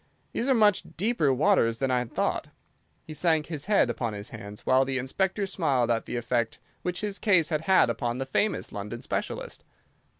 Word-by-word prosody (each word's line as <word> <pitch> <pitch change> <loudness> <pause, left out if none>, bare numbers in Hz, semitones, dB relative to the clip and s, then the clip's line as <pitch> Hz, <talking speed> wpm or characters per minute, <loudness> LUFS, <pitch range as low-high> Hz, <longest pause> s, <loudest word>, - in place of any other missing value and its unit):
"These 245 - -1
are 265 - +5
much 210 -4 +4 0.2
deeper 195 - +2
waters 130 - +3
than 135 0 0
I 125 - +3
had 125 -2 -5
thought." - - -1 0.6
He 155 - -8
sank 160 -1 +2
his 155 -3 -6
head 205 -9 +4
upon 120 -2 -2
his 100 0 -7
hands, 105 -2 -9
while 130 +1 +4
the 135 0 -1
Inspector 190 - -1
smiled 140 -11 +1
at 115 -1 -1
the - - -4
effect 120 -1 -1 0.2
which 180 0 -3
his 205 -2 -3
case 185 -7 +3
had 155 -2 0
had 190 -7 +5
upon 120 +1 -2
the 135 - -2
famous 205 +10 0
London 105 +4 -6
specialist. - - -4
135 Hz, 195 wpm, -27 LUFS, 120-190 Hz, 0.6 s, are